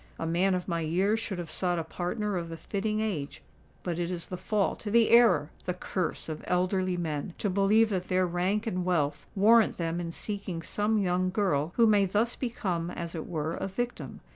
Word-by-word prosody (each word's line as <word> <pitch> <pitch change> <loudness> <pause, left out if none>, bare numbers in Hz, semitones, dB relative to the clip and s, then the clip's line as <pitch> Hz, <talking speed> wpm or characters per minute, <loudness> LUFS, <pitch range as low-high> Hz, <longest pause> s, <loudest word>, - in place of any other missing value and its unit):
A - - -3
man 180 +3 +2
of 180 - -3
my 170 -2 -1
years 190 +7 +1
should 210 -4 -4
have 175 -2 -6
sought 180 -2 0
a 165 - -1
partner 195 +5 -3
of 170 -2 -3
a 165 - -6
fitting 215 +5 -2
age; 165 -10 -3 0.4
but 175 -2 -2
it 175 0 -1
is 175 -2 -4
the 185 - -3
fault—the 210 +4 +1
error—the 180 -7 +4
curse 185 -1 -3
of 155 -1 -5
elderly 185 0 +1
men 160 -1 -3
to 205 - -1
believe 205 +4 +4
that 185 -2 -2
their 185 0 +2
rank 185 +5 0
and 185 -5 -1
wealth 150 -5 0
warrant 220 +3 +5
them 165 0 -2
in 170 -1 -4
seeking 195 -3 -5
some 210 +5 0
young 185 -2 +1
girl 180 -5 0
who 235 - +5
may 205 -2 +5
thus 210 +5 0
become 185 -9 -2
as 170 -1 -5
it 160 - -5
were 160 -1 -2
a - - -3
victim. 240 +6 -4
185 Hz, 195 wpm, -29 LUFS, 170-210 Hz, 0.4 s, warrant